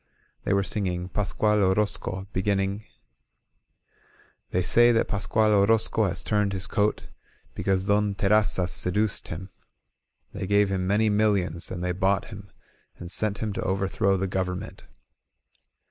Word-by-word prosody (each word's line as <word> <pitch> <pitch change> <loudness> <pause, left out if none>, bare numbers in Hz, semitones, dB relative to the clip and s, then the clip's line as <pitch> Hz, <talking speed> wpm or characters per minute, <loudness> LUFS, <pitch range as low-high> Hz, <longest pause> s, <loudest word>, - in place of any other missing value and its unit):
They - - +1
were 100 0 +2
singing 90 -3 -2
"Pascual 105 +2 +1
Orozco," 95 0 0
beginning: 100 +2 -1 1.6
They 90 - 0
say 120 +6 +5
that 115 - +1
Pasctud 105 +2 +1
Orozco 110 +2 +3
has 95 - -3
turned 105 -2 0
his 95 -1 -2
coat 105 -1 0 0.5
Because 95 -1 -1
Don 100 0 +1
Terrazzas 100 -3 +2
seduced 105 +3 0
him; 90 +4 -7 0.8
They 95 - -5
gave 100 0 +3
him 95 -1 -1
many 105 +3 +2
millions 100 -6 0
and 90 -1 -5
they 90 - 0
bought 95 +2 0
him 100 -2 -10 0.5
And 85 0 -9
sent 105 0 -1
him 105 -2 -2
to - - -4
overthrow 95 0 0
the 95 - -1
government. 95 +2 -4
100 Hz, 135 wpm, -26 LUFS, 95-105 Hz, 1.6 s, say